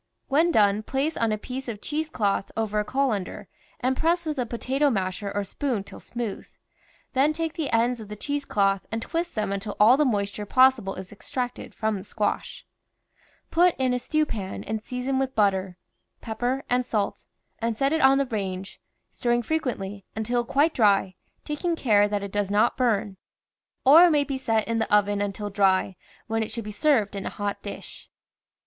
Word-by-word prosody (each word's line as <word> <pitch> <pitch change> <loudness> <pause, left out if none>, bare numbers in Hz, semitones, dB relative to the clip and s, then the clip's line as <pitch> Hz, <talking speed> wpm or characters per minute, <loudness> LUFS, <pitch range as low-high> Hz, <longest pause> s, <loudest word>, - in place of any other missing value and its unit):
When 315 +5 +4
done, 205 -5 +4
place 275 +7 -1
on 230 -1 +1
a 215 - 0
piece 260 +5 -6
of 220 -4 -5
cheese 305 +6 -3
cloth 200 -7 -1
over 215 -1 0
a - - +1
colander 210 -6 -2 0.3
and 255 +1 +1
press 335 +4 +1
w^ith 305 -3 -2
a 245 - -1
po 235 - -4
tato 275 +4 +1
masher 195 -2 -2
or 205 0 -1
spoon 235 +1 -2
till - - -11
smooth; 235 -4 -5 0.7
then 280 +4 +3
take 325 0 -2
the 315 -5 -3
ends 235 +1 +2
of 215 - -8
the 210 - -7
cheese 285 +7 -3
cloth 195 -6 +1
and 225 - -1
twist 340 +1 -3
them 215 -2 -1
until 200 +1 -4
all 225 +5 +7
the 300 - +4
mois 205 -7 0
ture 205 +1 -7
possible 255 -5 +4
is 185 0 -8
extracted 245 +4 -5
from 220 -1 -1
the 190 - -7
squash. 210 +1 -3 0.9
Put 350 +1 +4
in 255 -1 +1
a 250 - 0
stew 310 +4 +1
pan 195 -8 -5
and 220 +1 -4
season 255 +2 -2
with 265 0 -2
butter, 190 -3 +1 0.4
pep 220 -1 -7
per 255 +3 0
and 250 +1 +2
salt, 215 -4 -2 0.3
and 230 -1 -1
set 275 +4 +1
it 320 - +1
on 270 +1 +6
the 275 - +2
range, 195 -5 -5 0.3
stirring 240 0 0
fre 315 - -3
quently, 205 -9 -4
until 240 +2 0
quite 290 +6 +2
dry, 200 -4 +3 0.3
taking 330 +3 -1
care 210 -8 +3
that 205 -1 -2
it 200 - -5
does 205 -1 -1
not 210 +4 +3
burn. 220 -6 0 0.7
Or 315 +7 +9
it - - +5
may 295 -3 +3
be 275 -2 -4
set 225 -4 0
in 230 0 0
the 220 - -2
oven 205 0 +3
until 205 +1 -3
dry, 195 -1 +2 0.3
when 225 0 -1
it 220 - -2
should 230 +1 -5
be 210 - -5
served 215 -4 +2
in 195 - -4
a - - -1
hot 205 -1 -4
dish. - - -9
225 Hz, 200 wpm, -25 LUFS, 205-270 Hz, 0.9 s, Or